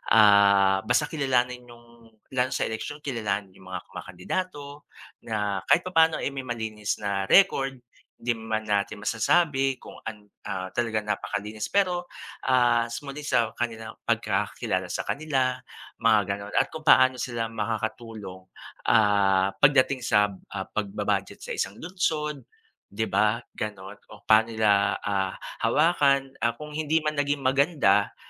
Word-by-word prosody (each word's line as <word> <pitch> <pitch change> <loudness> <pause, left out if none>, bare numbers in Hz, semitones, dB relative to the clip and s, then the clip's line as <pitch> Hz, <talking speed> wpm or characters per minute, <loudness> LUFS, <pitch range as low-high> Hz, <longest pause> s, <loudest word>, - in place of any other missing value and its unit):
ah, 100 -2 +6
basta 145 +5 +1
kilalanin 125 -4 0
yung 120 -1 -17 0.2
lalo 130 -1 +1
sa - - 0
eleksiyon 145 +7 -5
kilalanin 105 -7 -2
yung 95 - -15
mga 90 - -5
kumakandidato, 145 - -6 0.4
na 105 -3 -1
kahit 175 - +4
papaano 165 -3 +2
eh, 140 - -1
may 135 -2 -6
malinis 110 -3 -3
na 100 -1 -1
record. 135 -9 +4 0.4
Di 120 +1 -2
man 110 -1 -3
natin 105 0 -1
masasabi 135 +4 +2
kung - - -13
an 105 -2 -7 0.2
ah, 95 -2 -4
talagang 110 -3 -1
napakalinis, 105 +1 -3
pero 180 -3 0 0.4
ah, 120 -2 +3 0.2
muli 140 +1 -7
sa 120 -4 +2
kanilang 115 -2 -3 0.2
pagkakilala - - -1
sa - - -3
kanila 130 -4 -1 0.4
mga 115 -2 +4
ganon 100 +1 -5
at - - +2
kung 160 - -6
paano 130 -2 +6
sila 115 -2 -3
makakatulong, 110 -3 -5 0.4
ah, 100 -3 +4
pagdating 135 -2 +4
sa, 105 -4 +2 0.2
ah, 95 -1 -5
pagba-budget 105 -1 -3
sa - - -6
isang 100 - -2
lungsod, 155 - -2 0.5
di 100 +3 -3
ba? 110 +2 +1
Ganun 105 -1 -6
o - - -15
paano 110 +1 +5
nila, 105 -2 +3
ah, 95 -2 -1 0.3
hawakan, 140 -1 +2
ah, 120 0 0
kung 150 0 -9
hindi 155 +1 0
man 150 -1 -1
naging 145 -1 0
maganda, 135 - +2
115 Hz, 140 wpm, -26 LUFS, 105-140 Hz, 0.5 s, ah